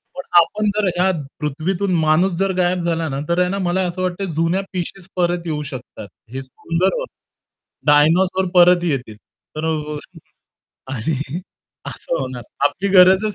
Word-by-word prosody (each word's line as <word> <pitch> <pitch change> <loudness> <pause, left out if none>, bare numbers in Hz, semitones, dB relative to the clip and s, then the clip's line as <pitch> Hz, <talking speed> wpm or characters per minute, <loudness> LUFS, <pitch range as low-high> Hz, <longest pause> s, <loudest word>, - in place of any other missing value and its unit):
पण 180 - -5 0.2
आपण 210 +5 -1
जर 210 -2 +2
या 185 +2 +3 0.3
पृथ्वीतून 175 +6 -1
माणूस 160 +5 +3
जर 195 0 +2
गायब 180 -1 +1
झाला 165 -1 0
ना, 135 - -3
तर 170 +1 +2
आहे 180 0 +3
ना 200 +1 -2
मला 185 +2 +1
असं 180 +1 -4
वाटत 185 +1 -2
जुन्या 165 +4 +1
पिशीज 185 +1 -5
परत 175 -1 +1
येऊ 150 -2 -2
शकतात. 120 -5 -8 0.2
हे 130 - -4
सुंदर 165 +8 -1
होत, - - -4 0.8
डायनोसॉर 175 +6 +4
परत 175 0 +6
येतील. 130 -10 -2 0.4
तर 155 +1 -3
अ, 150 -1 -2 1.0
आणि 135 +4 -2 0.7
असं - - -4
होणार. 130 -2 -5 0.2
आपली 175 +8 0
गरजच 190 +2 +5
175 Hz, 155 wpm, -20 LUFS, 150-185 Hz, 1.0 s, परत